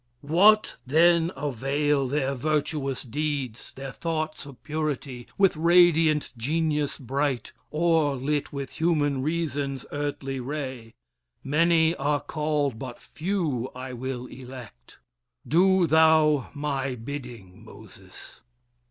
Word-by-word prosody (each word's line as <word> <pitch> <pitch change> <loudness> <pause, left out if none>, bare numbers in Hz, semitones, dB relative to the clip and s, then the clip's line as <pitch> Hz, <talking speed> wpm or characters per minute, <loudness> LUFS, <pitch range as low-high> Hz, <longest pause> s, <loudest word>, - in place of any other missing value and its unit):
What 205 +8 +4
then 165 +4 +4
avail 140 +1 0
their 140 0 0
virtuous 145 -1 -1
deeds, 135 -2 -3
their 135 0 -6
thoughts 155 -1 -3
Of 135 -3 -13
purity, 145 -5 -3
with 195 -3 +4
radiant 165 -2 +4
genius 150 +3 -1
bright, 135 -1 -2 0.2
Or 160 -3 +2
lit 145 +3 -2
with 140 -2 -5
human 145 -5 +1
reason's 145 -3 -2
earthly 145 -2 -3
ray? 130 -4 -5 0.5
Many 165 +3 +3
are 145 +1 +1
called, 150 -5 -1
but 125 -2 -7
few 155 - -2
I 130 0 -6
will 125 0 -5
elect. 125 - -11 0.5
Do 185 +3 +4
thou 155 -3 +4
my 140 -3 -2
bidding, 120 -6 -8
Moses!" - - -13
145 Hz, 110 wpm, -26 LUFS, 130-160 Hz, 0.5 s, What